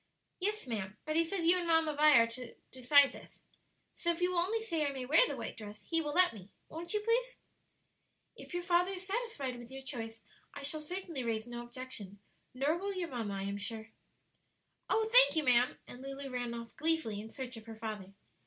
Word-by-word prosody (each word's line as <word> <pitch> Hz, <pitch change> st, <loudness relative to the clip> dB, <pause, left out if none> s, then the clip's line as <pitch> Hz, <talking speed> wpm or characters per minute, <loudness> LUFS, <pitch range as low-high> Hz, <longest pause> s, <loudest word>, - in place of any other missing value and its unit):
"Yes, 420 Hz, +3 st, -1 dB
ma'am; 210 Hz, -4 st, -4 dB
but 310 Hz, -, -2 dB
he 330 Hz, -, +5 dB
says 340 Hz, 0 st, -2 dB
you 355 Hz, +2 st, +6 dB
and 345 Hz, -, -2 dB
Mamma 325 Hz, -2 st, +3 dB
Vi 300 Hz, -1 st, +7 dB
are 230 Hz, -, +7 dB
to 230 Hz, +1 st, -9 dB, 0.2 s
decide 275 Hz, +2 st, +5 dB
this. -, -, -14 dB, 0.5 s
So 340 Hz, -, -2 dB
if 335 Hz, -, -4 dB
you 360 Hz, +1 st, +2 dB
will 355 Hz, -, +2 dB
only 400 Hz, +6 st, +1 dB
say 335 Hz, -9 st, -1 dB
I 285 Hz, -, 0 dB
may 265 Hz, -2 st, -5 dB
wear 315 Hz, -, +5 dB
the -, -, -4 dB
white -, -, -5 dB
dress, 210 Hz, -1 st, -10 dB
he 330 Hz, +6 st, +1 dB
will 295 Hz, -2 st, -3 dB
let 365 Hz, -4 st, +6 dB
me. 200 Hz, -3 st, -12 dB, 0.2 s
Won't 340 Hz, +5 st, -5 dB
you, 420 Hz, -, +1 dB
please?" 480 Hz, +3 st, 0 dB, 1.0 s
"If -, -, -12 dB
your 350 Hz, -, -2 dB
father 355 Hz, +2 st, +2 dB
is 375 Hz, 0 st, -7 dB
satisfied 385 Hz, -, -3 dB
with 240 Hz, 0 st, -11 dB
your 270 Hz, 0 st, -8 dB
choice 225 Hz, -5 st, -6 dB, 0.3 s
I -, -, -7 dB
shall 305 Hz, +2 st, -2 dB
certainly 335 Hz, -3 st, -5 dB
raise 225 Hz, -2 st, -1 dB
no 240 Hz, 0 st, -6 dB
objection; 240 Hz, -5 st, -7 dB, 0.3 s
nor 285 Hz, +6 st, 0 dB
will 400 Hz, +1 st, -3 dB
your 355 Hz, -2 st, -3 dB
mamma, 225 Hz, -6 st, -3 dB
I 195 Hz, -, -3 dB
am 200 Hz, +1 st, -3 dB
quite -, -, -8 dB
sure." 220 Hz, +1 st, -5 dB, 1.0 s
"Oh, 440 Hz, 0 st, +2 dB
thank -, -, +8 dB
you, 315 Hz, -, +2 dB
ma'am!" 250 Hz, -1 st, +3 dB
and 245 Hz, -, -11 dB
Lulu 275 Hz, 0 st, -6 dB
ran 245 Hz, -1 st, -3 dB
off 230 Hz, -1 st, -8 dB
gleefully 310 Hz, -10 st, +1 dB
in 220 Hz, -, -9 dB
search 255 Hz, 0 st, -6 dB
of 225 Hz, 0 st, -12 dB
her 225 Hz, -, -8 dB
father. 215 Hz, -3 st, -6 dB
275 Hz, 220 wpm, -33 LUFS, 230-345 Hz, 1.0 s, thank